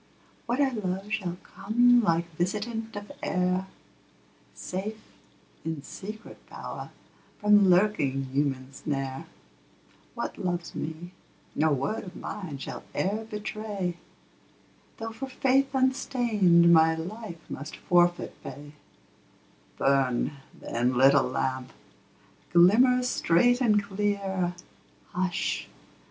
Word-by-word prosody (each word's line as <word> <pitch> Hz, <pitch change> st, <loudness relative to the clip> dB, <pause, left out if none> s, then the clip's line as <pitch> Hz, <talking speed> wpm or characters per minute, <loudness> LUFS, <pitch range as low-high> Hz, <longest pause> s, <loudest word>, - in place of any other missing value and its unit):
What 240 Hz, +3 st, 0 dB
I 280 Hz, -2 st, +4 dB
love 200 Hz, -3 st, -3 dB
shall 180 Hz, -5 st, -2 dB
come 240 Hz, +4 st, +3 dB
like 170 Hz, -4 st, +1 dB
visitant 210 Hz, +6 st, -3 dB
of 205 Hz, 0 st, -7 dB
air, 180 Hz, +1 st, 0 dB, 0.9 s
Safe 205 Hz, +4 st, -5 dB, 0.6 s
in 160 Hz, -3 st, -4 dB
secret 215 Hz, +8 st, -9 dB
power -, -, -7 dB, 0.5 s
from 210 Hz, -2 st, +5 dB
lurking 175 Hz, -8 st, +3 dB
human 135 Hz, -2 st, -1 dB
snare; 135 Hz, -2 st, -4 dB, 0.9 s
What -, -, -4 dB
loves 175 Hz, -1 st, -2 dB
me, 160 Hz, +3 st, -5 dB, 0.4 s
no 155 Hz, +1 st, +2 dB
word 140 Hz, +10 st, -1 dB
of 185 Hz, -2 st, -10 dB
mine 180 Hz, -9 st, -6 dB
shall 135 Hz, -, -6 dB
e'er 215 Hz, +4 st, -1 dB
betray, 210 Hz, -4 st, -4 dB, 1.0 s
Though 225 Hz, 0 st, -5 dB
for 265 Hz, +4 st, -6 dB
faith 270 Hz, +1 st, +2 dB
unstained 220 Hz, -10 st, +4 dB
my 160 Hz, 0 st, +5 dB
life 175 Hz, +1 st, -7 dB
must 145 Hz, +3 st, -7 dB
forfeit 175 Hz, 0 st, +2 dB
pay 145 Hz, +1 st, -9 dB, 1.1 s
Burn, 135 Hz, -1 st, +2 dB, 0.3 s
then, 120 Hz, +2 st, -1 dB
little 135 Hz, +1 st, +6 dB
lamp; 130 Hz, 0 st, -2 dB, 0.8 s
glimmer 240 Hz, +9 st, +6 dB
straight 245 Hz, +1 st, +3 dB
and 210 Hz, -4 st, +3 dB
clear 195 Hz, -3 st, -1 dB, 0.6 s
Hush! 185 Hz, 0 st, -1 dB
185 Hz, 105 wpm, -27 LUFS, 160-215 Hz, 1.1 s, little